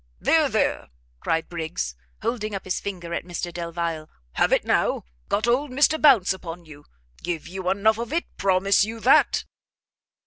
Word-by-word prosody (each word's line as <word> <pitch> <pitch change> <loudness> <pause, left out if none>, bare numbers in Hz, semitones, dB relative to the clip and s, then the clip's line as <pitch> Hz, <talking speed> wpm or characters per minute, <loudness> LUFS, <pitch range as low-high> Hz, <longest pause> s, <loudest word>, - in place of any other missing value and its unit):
"There, - - +3
there!" - - 0 0.3
cried 165 - -1
Briggs, 160 - -4 0.3
holding 215 -3 -2
up 195 - -5
his 185 - -1
finger 175 -4 -6
at - - -2
Mr 175 0 -5
Delvile, 170 -2 -4 0.2
"have - - +1
it - - +2
now! - - +1 0.3
got 210 - +1
old 265 +5 +2
Mr 290 +4 +2
Bounce 250 -12 +6
upon 175 -2 -8
you! 145 -2 -14 0.4
give 170 -2 -4
you 185 0 -3
enough 210 +3 +2
of 235 +2 -4
it; 335 +2 0
promise 195 +1 +3
you 225 +2 -4
that!" 255 - +4
185 Hz, 165 wpm, -24 LUFS, 170-220 Hz, 0.4 s, Bounce